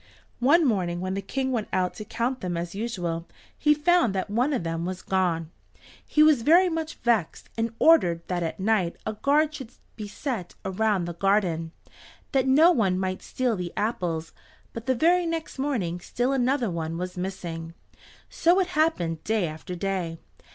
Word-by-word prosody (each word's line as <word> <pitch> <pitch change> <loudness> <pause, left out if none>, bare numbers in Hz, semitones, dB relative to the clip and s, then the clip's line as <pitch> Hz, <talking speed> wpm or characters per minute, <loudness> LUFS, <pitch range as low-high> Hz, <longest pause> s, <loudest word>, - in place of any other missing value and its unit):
One 300 +7 +5
morning, 180 -8 0
when 185 +1 -3
the 195 - -2
King 265 +6 -2
went 230 -4 -1
out 185 -1 0
to 215 - -8
count 245 +4 -2
them 175 -2 -2
as 170 0 -4
usual 180 -6 -3 0.3
he 300 0 +3
found 305 - +3
that 190 +2 -2
one 245 +7 +1
of 260 - -1
them 165 0 -3
was 185 +1 -4
gone. 170 -4 0 0.5
He 305 - +3
was 305 -5 +5
very 345 +8 +5
much 325 -1 -3
vexed, 225 -8 -1
and 230 0 -2
ordered 175 - +4
that 180 -1 -1
at 165 +2 -3
night 190 -4 +1
a 215 - -2
guard 295 +7 +2
should 265 -6 -8 0.2
be 210 -2 -6
set 215 - -5
around 195 -1 +1
the 175 - -4
garden, 175 -3 +1 0.6
that 265 -1 +2
no 310 +7 +6
one 195 - +2
might 185 0 -2
steal 250 -3 -1
the 180 -2 -4
apples, 175 -7 -2 0.4
but 230 0 -7
the 260 - +2
very 345 +6 +3
next 325 -4 -4
morning 215 -12 -1
still 245 +8 -1
another 255 -4 +1
one 165 -1 -3
was 180 +1 -4
missing. 170 -3 -5 0.5
So 345 +3 +3
it 370 -1 0
happened 300 - 0
day 215 -5 0
after 155 +3 -7
day. 180 -3 -2
210 Hz, 180 wpm, -26 LUFS, 175-270 Hz, 0.6 s, no